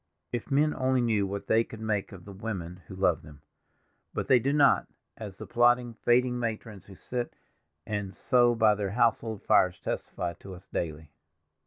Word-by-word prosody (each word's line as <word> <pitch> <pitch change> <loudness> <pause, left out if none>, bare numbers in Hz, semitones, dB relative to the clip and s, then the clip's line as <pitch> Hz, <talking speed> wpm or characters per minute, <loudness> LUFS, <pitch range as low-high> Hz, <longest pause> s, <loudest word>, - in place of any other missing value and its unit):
If 120 +3 -4
men 150 +2 +3
only 130 0 +1
knew 110 -5 +1
what 100 +1 -5
they 115 +1 +3
could 110 - -11
make 110 -2 -2
of 95 -3 -11
the 100 - -9
women 95 -4 -6
who 95 - -9
love 90 -4 +2
them—but 75 -1 -11
they 130 - +6
do 135 +4 0
not, 145 -1 +4 0.3
as 100 -4 -8
the - - -8
plodding, 120 0 +3
faded 120 +2 +2
matrons 115 -5 -4
who 100 - -12
sit 120 +5 -5 0.5
and 105 -2 -3
sew 120 -1 +3
by 110 -2 +5
their 105 -1 -2
household 115 -1 0
fires 90 -1 +3
testify 85 -1 -4
to 95 -1 -9
us 90 +2 -16
daily. 80 -2 -4
110 Hz, 175 wpm, -28 LUFS, 95-120 Hz, 0.5 s, they